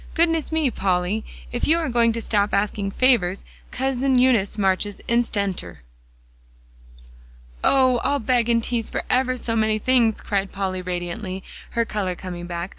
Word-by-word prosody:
"Goodness 330 -2 +1
me, 315 -5 +1
Polly, 190 +2 0 0.3
if - - -1
you 320 +2 +4
are 330 -2 -1
going 235 -2 +3
to 230 - -3
stop 205 -2 +1
asking 200 0 0
favors, 200 -5 +2 0.2
Cousin 265 0 0
Eunice 240 -6 +3
marches 195 0 0
instanter!" 200 - -1 1.8
"Oh! 260 -2 +4
I'll 285 - +1
beg 240 -1 +1
and 230 -1 +2
tease 235 -2 -2
for - - -3
ever 255 0 +2
so 230 -2 -2
many 215 -1 +2
things," 235 -1 +2
cried 195 -2 -2
Polly 190 -2 -3
radiantly, 180 +2 -4 0.3
her 235 -1 +1
color 195 -5 -2
coming 175 -1 -7
back. 170 +1 -4
220 Hz, 150 wpm, -23 LUFS, 190-250 Hz, 1.8 s, you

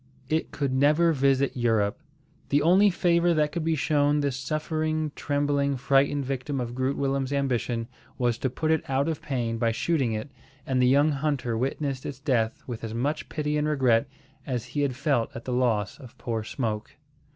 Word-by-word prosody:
It 160 +1 0
could 140 -3 -2
never 150 +5 +4
visit 135 -1 +2
Europe. 110 -3 +1 0.5
The 145 +1 +3
only 190 +5 +6
favour 170 -1 +2
that 150 -1 +2
could 170 0 -3
be 160 0 +1
shown 145 0 +2
this 140 -3 -1
suffering, 155 +2 -2
trembling, 145 -1 0
frightened 140 +1 +2
victim 135 +1 -3
of 120 -1 -3
Groot 130 +2 -1
Willem's 135 -1 -1
ambition 125 -4 -1 0.3
was 120 -2 0
to 130 - 0
put 155 +5 -1
it 160 - +2
out 135 +2 +1
of 160 -2 -2
pain 120 -5 -2
by 115 -1 +2
shooting 130 0 0
it, 110 +6 -5 0.3
and 130 -1 +1
the 125 - +4
young 145 +4 +4
hunter 140 -5 -1
witnessed 135 +2 -2
its 135 - -6
death 125 -6 0
with 120 -2 -6
as 110 0 -4
much 145 +6 -2
pity 150 -1 -1
and 150 0 0
regret 130 -4 +2 0.4
as 125 -4 -2
he 145 - -3
had 140 -3 0
felt 135 -3 +1
at 115 - -7
the 125 - -2
loss 115 -4 0
of 130 -5 -13
poor 115 -2 -3
Smoke. 110 -2 -4
135 Hz, 185 wpm, -26 LUFS, 120-150 Hz, 0.5 s, only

